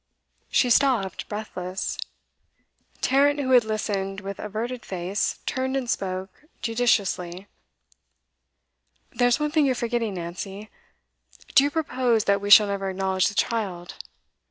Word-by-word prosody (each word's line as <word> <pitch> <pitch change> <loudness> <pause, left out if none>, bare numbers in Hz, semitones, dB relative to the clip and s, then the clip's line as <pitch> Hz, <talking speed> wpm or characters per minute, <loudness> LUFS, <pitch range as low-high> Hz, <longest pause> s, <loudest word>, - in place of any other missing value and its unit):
She 250 - +2
stopped, 235 -8 +2
breathless. 190 -3 -4 1.1
Tarrant, 285 +2 +3
who 260 -2 -1
had 250 -2 +7
listened 200 -3 -2
with 200 0 -7
averted 230 +4 -4
face, 185 +2 -2
turned 260 +1 -1
and 260 -2 -3
spoke 190 +3 -4 0.2
judicially. 200 -6 0 1.7
'There's 245 +2 +2
one 300 0 -1
thing 305 -2 +3
you're 260 - +1
forgetting, 235 -3 -2
Nancy. 190 +4 -7 0.8
Do 270 - +7
you 285 - +2
propose 255 -7 +1
that 200 -1 +2
we 205 - -3
shall 210 +1 +9
never 200 -1 -2
acknowledge 190 0 +1
the 200 - -4
child? 195 -8 -2
215 Hz, 125 wpm, -25 LUFS, 195-250 Hz, 1.7 s, shall